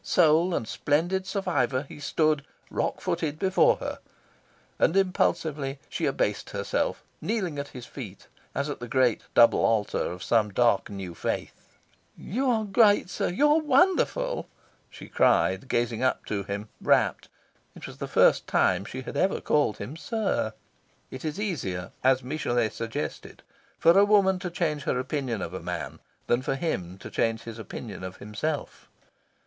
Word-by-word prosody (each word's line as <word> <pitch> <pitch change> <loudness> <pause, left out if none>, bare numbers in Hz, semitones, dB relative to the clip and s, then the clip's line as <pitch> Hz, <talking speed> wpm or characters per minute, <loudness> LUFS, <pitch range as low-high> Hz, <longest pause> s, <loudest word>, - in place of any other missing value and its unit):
Sole 170 +1 +4
and 110 - -2
splendid 175 - 0
survivor 145 - 0
he - - -11
stood, 155 0 +1 0.3
rock - - -1
footed, 150 -2 -2
before 190 +2 +3
her. - - -5 0.8
And 165 - +3
impulsively 155 -7 0
she - - -1
abased - - -1
herself, - - -2 0.2
kneeling 185 -10 -2
at 140 - -4
his 125 -3 -9
feet 110 -8 -9 0.3
as 140 - -1
at 145 - -5
the 120 - -6
great 125 -1 +2
double 115 - +6
altar 110 -5 +1
of 90 0 -7
some 110 -2 +2
dark 120 +4 +2
new 95 -4 -6
faith. - - -5 0.4
"You 255 +8 -1
are 225 -3 +2
great, 205 -2 +4
sir, - - -1
you 240 +12 +3
are 310 - +5
wonderful," 380 +10 +2 0.4
she - - -11
said, 135 - +3
gazing 120 -2 0
up 130 - +1
to 100 -2 -2
him, 100 +2 -5
rapt. - - +2 0.5
It - - -9
was - - -9
the - - -3
first - - +4
time 95 +1 +2
she 130 - -6
had - - -7
ever 190 +7 +1
called 145 -8 +1
him 120 +10 -6
"sir." 195 - -1 0.6
It 130 - -8
is 155 +4 -3
easier, 105 - -3
as 130 0 +4
Michelet 120 -4 -1
suggested, 115 -1 -5 0.3
for 165 +1 +5
a 200 - +7
woman 200 -3 +4
to 180 -1 -4
change 155 -4 -2
her - - 0
opinion 130 -4 -2
of 85 - -6
a 95 - -4
man 90 -1 -5 0.3
than 120 +1 +2
for 135 - -1
him 95 - -3
to - - -10
change 115 -1 0
his 115 -1 -8
opinion 110 -1 -7
of 95 0 -7
himself. 145 +9 -4
140 Hz, 165 wpm, -27 LUFS, 115-180 Hz, 0.8 s, a